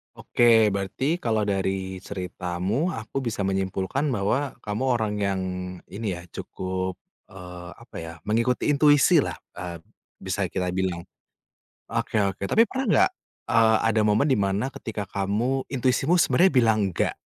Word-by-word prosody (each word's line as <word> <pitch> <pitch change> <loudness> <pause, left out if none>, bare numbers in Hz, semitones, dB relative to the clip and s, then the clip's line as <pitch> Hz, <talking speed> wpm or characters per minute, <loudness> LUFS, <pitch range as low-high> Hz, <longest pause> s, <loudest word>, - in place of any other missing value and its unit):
Oke, 115 -3 +4
berarti 130 - -1
kalau 110 -6 0
dari 95 -1 -2
ceritamu, 95 - -3
aku 115 +3 -4
bisa 115 -6 -2
menyimpulkan 95 +8 -1
bahwa 125 +3 0
kamu 105 +4 -3
orang 110 -4 +1
yang, 100 -2 0 0.5
ini 100 -2 -3
ya 90 - -8
cukup, 95 0 -4 0.3
eee, 90 -2 -10
apa 115 +1 -17
ya, 80 0 -7
mengikuti 115 +6 +1
intuisilah, 145 +2 +4 0.2
eee, 90 -1 -5 0.4
bisa - - -1
kita 90 -1 -2
bilang. 90 -2 -1 0.9
Oke - - -2
oke, 100 -1 -2
tapi 225 - +5
pernah 265 +1 -2
nggak, - - +5 0.4
eee, 115 -1 +5
ada 110 -1 +2
momen 105 +7 +3
di 130 - +3
mana 100 +6 0
ketika 110 -5 -5
kamu 110 +7 -1
intuisimu 135 +5 +1
sebenarnya 185 +1 +4
bilang 115 -4 +4
nggak, - - 0
105 Hz, 140 wpm, -25 LUFS, 95-125 Hz, 0.9 s, tapi